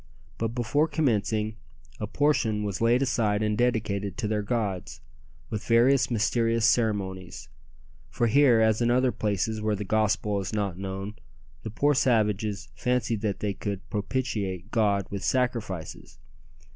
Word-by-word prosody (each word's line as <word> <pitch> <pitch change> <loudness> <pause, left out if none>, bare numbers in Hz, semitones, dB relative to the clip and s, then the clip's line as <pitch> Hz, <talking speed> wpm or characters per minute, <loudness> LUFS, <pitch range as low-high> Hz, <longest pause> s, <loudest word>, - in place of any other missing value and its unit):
But 115 +1 -2
before 145 +6 +1
commencing 110 -7 0 0.4
a 105 - -3
portion 120 -6 +1
was 100 -1 -3
laid 120 +3 +3
aside 110 -5 +1
and 105 0 +1
dedicated 105 -5 -1
to 110 -1 -2
their 105 0 0
gods, 100 - -3 0.5
with 105 -1 -3
various 125 +3 +4
mysterious 115 0 +1
ceremonies; 95 - 0 0.6
for 120 - 0
here, 120 -1 +5
as 110 +1 +3
in 120 - +2
other 125 +1 +3
places 110 +1 -1
where 105 -1 0
the 105 - -4
gospel 105 0 +1
is 95 +2 -5
not 100 -4 -1
known, 95 +2 -6 0.4
the 110 - -6
poor 145 +7 +2
savages 105 -5 +1
fancied 120 -4 -1
that 105 -3 -2
they 105 -1 -1
could 100 0 -5
propitiate 105 -4 -3
God 100 -4 +2
with 100 -1 -4
sacrifices. 100 - -2
110 Hz, 145 wpm, -27 LUFS, 100-120 Hz, 0.6 s, here